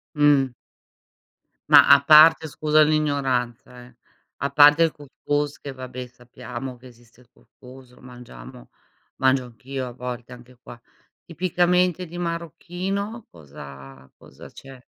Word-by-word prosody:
Mh. 145 -3 +2 1.2
Ma - - +7
a 140 0 +6
parte 155 +2 +6
scusa 155 +2 +1
l'ignoranza, 135 -5 -2
eh, 120 -1 -20 0.4
a 140 - -3
parte 145 +2 +5
il 165 - +3
cous 145 -1 -16
cous 145 0 -2
che 140 - -8
vabbè 130 -1 -9
sappiamo 125 +1 -10
che 125 +1 -18
esiste 120 0 -22
il 120 - -24
cous - - -28
cous, 125 -1 -16
lo - - -21
mangiamo, 120 - -14 0.5
mangio 130 -1 +1
anch'io 125 +3 -8
a 125 - -9
volte 125 0 -8
anche 125 0 -16
qua. 120 -1 -14 0.4
Tipicamente 180 +1 0
di 175 +2 -10
marocchino 180 +6 -5
cosa 70 -4 -14
cosa - - -15
c'è? 135 -2 -15
130 Hz, 135 wpm, -22 LUFS, 125-155 Hz, 1.2 s, Ma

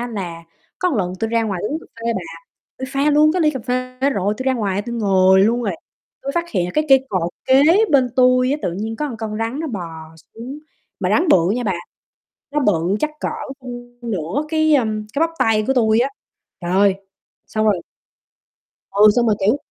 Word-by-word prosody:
á, 240 - -3
là 175 -7 -6 0.4
có 365 - +1
lần 180 -2 -1
tui 225 - 0
ra 230 0 +2
ngoài 195 -5 -2
uống 310 - -2
cà - - -16 0.2
phê 235 - +1
bà, 190 - -2 0.6
tui 260 - -4
pha 275 +3 +1
luôn 305 +1 +5
cái 360 -2 +1
ly 305 - +4
cà 265 -4 -5
phê 255 0 -3
rồi, 205 -2 0
tui 260 - -5
ra 265 - +2
ngoài, 200 -3 -1
tui 235 +1 -6
ngồi 190 -3 +4
luôn 235 +4 +2
rồi, 200 -6 -1 0.5
tui 275 - -3
phát 340 - +1
hiện 185 -6 0
là 180 - -3
cái 305 - +2
cây 265 0 +5
cột 180 -5 -1
kế 265 +1 +5 0.3
bên 265 -3 +4
tui 255 0 +4
á, 290 - +1
tự 175 - -1
nhiên 220 +5 -4
có 300 - -2
một 245 - -6
con 220 -1 -5
rắn 230 +6 -2
nó 325 - -3
bò 210 - -4 0.5
xuống. 250 +6 -8 0.4
Mà - - 0
rắn 360 - +3
bự 175 - +4
nha 245 +4 0
bà, 200 - +1 0.8
nó 295 +1 0
bự 190 - +1
chắc 305 - 0
cỡ, - - -1 0.3
ưm, 245 -1 -10
nửa 185 - -2
cái, 315 -1 +3
ờm, 215 -5 0
cái 280 - -2
bắp 330 - +2
tay 215 -1 +2
của 270 - +2
tui 220 -3 +3
á. 260 - +2 0.5
Trời 175 0 -3
ơi, 195 +1 +4 0.5
xong 215 0 -1
rồi 200 -5 +2 1.1
Ừ, 205 +2 +6
xong 240 -1 +3
rồi, 215 - +2
kiểu, 225 +7 +4
230 Hz, 220 wpm, -20 LUFS, 200-265 Hz, 1.1 s, Ừ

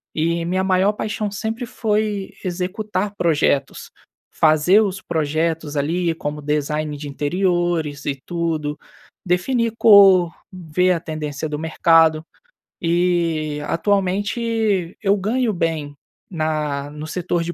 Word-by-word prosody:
e 165 +1 0
minha 185 +2 0
maior 190 +2 +2
paixão 210 0 -3
sempre 225 +4 -4
foi 210 -3 -2
executar 190 +3 -3
projetos, 145 -4 0 0.4
fazer 160 +7 +4
os 190 -2 -2
projetos 160 -1 -1
ali, 165 +4 0
como 150 -1 -5
design 150 0 -2
de 145 0 -7
interiores 170 0 -1
e 140 -2 -2
tudo, 160 -4 -2 0.5
definir 230 +6 0
cor, 195 -5 +7 0.2
ver 180 0 0
a 170 - -1
tendência 155 -2 -5
do 150 0 -4
mercado 160 0 +3 0.6
e 165 -3 0
atualmente 205 0 0
eu 200 0 +3
ganho 220 +3 0
bem 160 -4 -2 0.3
na 155 -4 -2
no 150 +1 -7
setor 175 0 -2
de 175 +1 -4
170 Hz, 115 wpm, -21 LUFS, 155-195 Hz, 0.6 s, cor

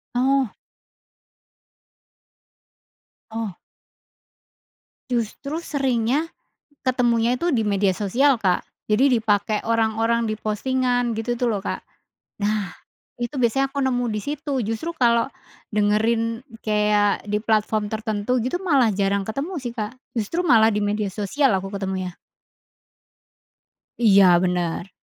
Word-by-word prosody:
Oh. 265 -1 +2 2.8
Oh. 220 -4 -4 1.6
Justru 250 +6 -2
seringnya 275 0 0 0.6
ketemunya 240 -2 +2
itu 340 +7 0
di 225 -7 +1
media 200 -1 +2
sosial, 240 +8 +2
Kak. 190 -5 +1 0.2
Jadi 245 +4 +3
dipakai 210 -1 0
orang-orang 230 +1 +1
di 215 - -3
postingan 245 +2 0
gitu 240 +2 -1
tuh 240 0 0
loh 205 -3 -1
Kak. - - -4 0.6
Nah, 205 -1 -1 0.5
itu 240 +4 -3
biasanya 260 +3 +2
aku 280 - -4
nemu 245 -1 +1
disitu, 285 +6 -3
justru 225 +9 -3
kalau 235 -1 +3 0.4
dengerin 225 +2 +1 0.2
kayak 210 -1 +2
di 210 - +1
platform 215 -1 +1
tertentu 220 +3 -1
gitu 255 +9 -1
malah 270 -8 +4
jarang 200 0 +1
ketemu 275 - -4
sih 245 -2 -4
Kak, 220 -1 -4 0.2
justru 230 - -1
malah 225 -10 +5
di 210 - 0
media 205 0 0
sosial 235 +6 +1
aku 195 0 -1
ketemunya. 190 -2 -4 1.8
Iya 195 -6 +6
bener. 180 0 -1
225 Hz, 115 wpm, -23 LUFS, 210-250 Hz, 2.8 s, Iya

